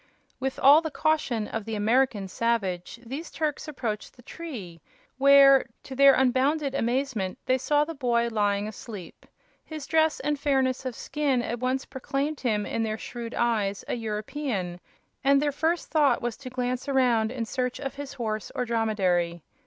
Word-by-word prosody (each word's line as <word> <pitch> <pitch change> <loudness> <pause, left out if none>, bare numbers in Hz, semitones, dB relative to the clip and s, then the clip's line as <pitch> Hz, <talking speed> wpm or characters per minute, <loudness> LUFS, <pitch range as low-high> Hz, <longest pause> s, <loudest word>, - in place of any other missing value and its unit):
With 265 0 -2
all 285 +4 +7
the 320 - -3
caution 275 -8 0
of 225 - -4
the 225 +1 -4
American 215 -1 +2
savage 195 -2 -1
these 280 +8 -6
Turks 305 0 -3
approached 235 -8 -4
the 245 - -17
tree, 230 - -8 0.4
where, 275 -1 +7 0.2
to 265 - -8
their 275 0 +7
unbounded 270 +3 +2
amazement, 240 -6 -1
they 255 0 +2
saw 295 +3 +2
the 330 - -6
boy 240 -5 +1
lying 205 -2 0
asleep. 205 -4 -9 0.4
His 310 -3 -7
dress 315 -1 +2
and 295 +1 -1
fairness 265 -2 +1
of 250 - -5
skin 280 -5 -1
at 235 0 -3
once 255 +2 -1
proclaimed 275 +2 -3
him, 215 -5 0
in 230 - -2
their 220 -1 -1
shrewd 235 +1 -7
eyes, 210 -4 0
a - - -2
European, 215 -4 -3 0.4
and 275 0 +5
their 290 0 +1
first 320 +4 -1
thought 290 -6 +3
was 240 -1 -3
to 260 - -8
glance 250 +1 -3
around 240 -5 +2
in 245 -3 -3
search 250 +1 -2
of 270 -1 -4
his 285 0 -7
horse 220 -5 -4
or 250 - -1
dromedary. 185 -8 0
250 Hz, 170 wpm, -27 LUFS, 220-275 Hz, 0.4 s, all